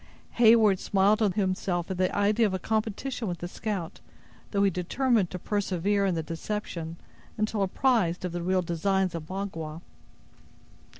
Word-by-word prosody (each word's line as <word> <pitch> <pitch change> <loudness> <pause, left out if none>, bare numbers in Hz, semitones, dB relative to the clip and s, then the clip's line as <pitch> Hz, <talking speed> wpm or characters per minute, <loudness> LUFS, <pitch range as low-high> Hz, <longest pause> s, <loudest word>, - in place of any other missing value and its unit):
Heyward 220 -4 +6
smiled 200 +2 +3
to 215 -3 +3
himself 185 -2 -1
at 185 - -4
the 185 -1 +1
idea 210 +2 +3
of 190 - -2
a - - 0
competition 220 +4 -2
with 175 -2 -3
the 175 - -5
scout, 190 -3 -4 0.5
though 200 -1 +1
he 200 - +4
determined 205 +3 +1
to 180 - -5
persevere 200 +1 0
in 185 - 0
the 160 - -2
deception, 165 0 -5 0.4
until 215 -1 0
apprised 195 -4 +1
of 180 - -3
the 175 0 -3
real 185 +1 +1
designs 185 +2 0
of 160 -2 -6
Magua. 170 -4 -5
190 Hz, 160 wpm, -27 LUFS, 175-210 Hz, 0.5 s, Heyward